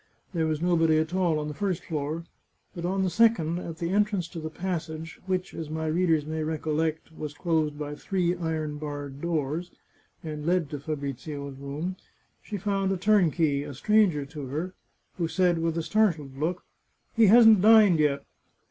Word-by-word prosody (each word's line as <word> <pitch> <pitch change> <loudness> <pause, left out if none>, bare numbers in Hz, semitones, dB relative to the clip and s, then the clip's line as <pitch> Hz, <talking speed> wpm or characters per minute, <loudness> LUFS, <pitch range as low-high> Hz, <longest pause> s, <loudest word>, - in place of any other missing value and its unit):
There 165 -2 +1
was 155 +1 -1
nobody 165 -3 +3
at 160 +2 0
all 180 -4 +2
on 150 0 -3
the 150 - -4
first 185 +2 -2
floor, 155 +1 -3 0.5
but 170 -1 -5
on 190 +2 0
the 185 - +1
second, 175 -5 +3
at 165 -2 -7
the 170 +1 -2
en 205 +2 +5
trance 200 -5 -3
to 170 - -7
the 155 0 -5
passage, 160 -2 -5
which, 185 -1 -2
as 160 -2 -6
my 160 +1 -3
readers 160 -1 +2
may 155 +1 -3
recollect, 155 +1 -2
was 150 -2 -6
closed 155 -3 0
by 150 -1 -4
three 180 +2 -1
iron 155 -3 -3
barred 145 -2 -6
doors, 165 0 -2 0.5
and 150 -2 -5
led 170 -2 +1
to 145 - -4
Fabrizio's 140 -1 -5
room, 150 +7 -4 0.4
she 210 - -5
found 195 0 0
a 190 - 0
turnkey, 175 -7 +3
a 145 -1 -7
stranger 195 - +3
to 145 -1 -7
her, 160 +8 -4 0.5
who 170 - +1
said, 175 -1 +2
with 165 0 -1
a 165 - -1
startled 165 -10 +1
look: 160 +6 -2 0.3
" - - -44
He 225 -2 +6
hasn't 220 -1 +8
dined 210 -5 +7
yet." 145 -2 +1
160 Hz, 185 wpm, -27 LUFS, 150-180 Hz, 0.5 s, hasn't